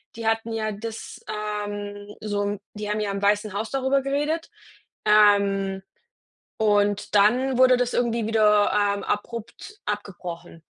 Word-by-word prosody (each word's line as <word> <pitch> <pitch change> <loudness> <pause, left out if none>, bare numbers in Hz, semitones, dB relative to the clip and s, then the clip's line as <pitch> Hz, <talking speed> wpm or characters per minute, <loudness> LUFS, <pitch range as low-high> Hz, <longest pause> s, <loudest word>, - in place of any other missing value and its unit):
die 230 -1 -4
hatten 225 0 0
ja 215 -1 -1
das, 225 +2 -7
ähm 205 -1 -5
so 205 -1 -2
'n 205 0 -2 0.2
die 210 0 -5
haben 210 - -1
ja 210 -1 -1
im 195 0 -4
Weißen 205 0 +1
Haus 215 +2 -3
darüber 270 0 +1
geredet. 295 +4 -1 0.6
Ähm, 200 -2 +4 0.8
und 205 -1 +1
dann 245 +6 +3
wurde 255 -1 +6
das 245 0 0
irgendwie 235 -2 0
wieder, 210 -2 +4
ähm, 205 -1 +1
abrupt 235 - -5
abgebrochen 175 -5 -6
210 Hz, 140 wpm, -24 LUFS, 205-230 Hz, 0.8 s, wurde